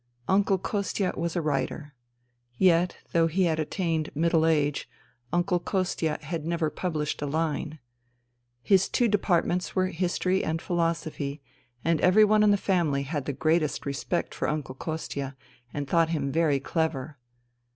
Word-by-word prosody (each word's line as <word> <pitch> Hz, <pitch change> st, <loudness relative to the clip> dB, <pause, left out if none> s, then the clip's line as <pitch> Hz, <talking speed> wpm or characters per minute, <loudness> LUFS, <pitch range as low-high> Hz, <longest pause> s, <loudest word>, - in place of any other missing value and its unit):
Uncle 195 Hz, 0 st, +3 dB
Kostia 200 Hz, 0 st, -1 dB
was 170 Hz, +1 st, -2 dB
a 170 Hz, -, 0 dB
writer. 145 Hz, 0 st, -2 dB, 0.6 s
Yet, 180 Hz, -1 st, +3 dB, 0.2 s
though 165 Hz, -1 st, +4 dB
he 180 Hz, +4 st, +1 dB
had 160 Hz, -3 st, +1 dB
attained 160 Hz, 0 st, -1 dB
middle 160 Hz, +1 st, +3 dB
age. 150 Hz, -3 st, +1 dB, 0.4 s
Uncle 175 Hz, +1 st, +1 dB
Kostia 175 Hz, -4 st, -1 dB
had 160 Hz, +1 st, -4 dB
never 165 Hz, -1 st, -1 dB
published 155 Hz, -5 st, -2 dB
a 145 Hz, -, -1 dB
line. 155 Hz, +1 st, -2 dB, 0.9 s
His 195 Hz, -2 st, +4 dB
two 245 Hz, -, +2 dB
departments 180 Hz, -3 st, +1 dB
were 185 Hz, -1 st, +2 dB
history 185 Hz, +2 st, 0 dB
and 160 Hz, +1 st, -1 dB
philosophy, 160 Hz, -5 st, -2 dB, 0.4 s
and 165 Hz, -1 st, +2 dB
every 200 Hz, +4 st, +6 dB
one 210 Hz, 0 st, +4 dB
in 210 Hz, -, +5 dB
the 205 Hz, -, +4 dB
family 170 Hz, -8 st, +1 dB
had 145 Hz, -1 st, -3 dB
the -, -, -1 dB
greatest 155 Hz, +1 st, +1 dB
respect 140 Hz, +5 st, -2 dB
for -, -, -2 dB
Uncle 150 Hz, -4 st, -3 dB
Kostia 140 Hz, -2 st, -5 dB, 0.4 s
and 145 Hz, -1 st, -4 dB
thought 165 Hz, +3 st, +3 dB
him 145 Hz, -4 st, -1 dB
very 155 Hz, -2 st, +2 dB
clever. 150 Hz, -2 st, -2 dB
165 Hz, 150 wpm, -27 LUFS, 150-180 Hz, 0.9 s, every